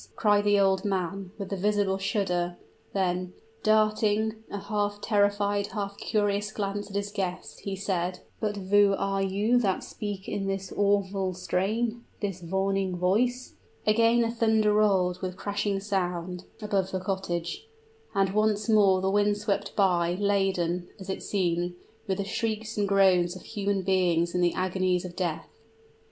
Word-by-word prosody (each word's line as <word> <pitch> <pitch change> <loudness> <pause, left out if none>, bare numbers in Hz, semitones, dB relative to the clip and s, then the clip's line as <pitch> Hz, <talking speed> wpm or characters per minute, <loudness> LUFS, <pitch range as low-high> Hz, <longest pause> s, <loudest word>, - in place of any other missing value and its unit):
cried 205 -1 +3
the 205 0 +4
old 190 -1 +3
man, 195 -1 -2
with 200 -1 -5
a - - +1
visible 200 0 +1
shudder; 180 -4 -1 0.3
then 180 -1 -1 0.3
darting 215 0 +2 0.2
a - - -4
half 205 0 -2
terrified, 205 -1 +1
half 200 -2 -4
curious 205 0 0
glance 205 -1 -3
at 200 - -9
his 200 0 -2
guest, 190 -3 -4
he 195 -1 -4
said, 185 -2 -2 0.2
"but 210 -2 -1
who 200 +1 +4
are 195 0 0
you 205 +5 +2
that 195 -6 0
speak 205 -2 -6
in 195 -1 -2
this 195 -1 -3
awful 200 -2 +1
strain 220 +6 -1 0.2
this 195 -3 -3
warning 190 +1 -1
voice?" 240 +8 +1 0.3
Again 230 +2 +4
the 230 0 +1
thunder 220 -2 +3
rolled, 190 -4 +2
with 185 -1 -4
crashing 205 -1 -1
sound, 180 -3 -2 0.2
above 195 -3 0
the 190 - -2
cottage; 185 - -3 0.5
and 195 -1 +2
once 215 0 +1
more 200 -4 +5
the 190 0 +1
wind 205 0 +2
swept 205 -1 -2
by, 175 -3 +2
laden, 190 -3 0
as 190 0 -5
it - - -4
seemed, 175 -2 -1 0.3
with 190 -1 0
the 200 - -1
shrieks 220 +2 -2
and 205 -1 +1
groans 190 -3 +4
of 185 - -10
human 200 -2 -2
beings 175 -3 +2
in 180 - +1
the 175 -1 +2
agonies 185 -1 0
of 175 -1 -8
death. 170 - -4
195 Hz, 155 wpm, -27 LUFS, 185-205 Hz, 0.5 s, more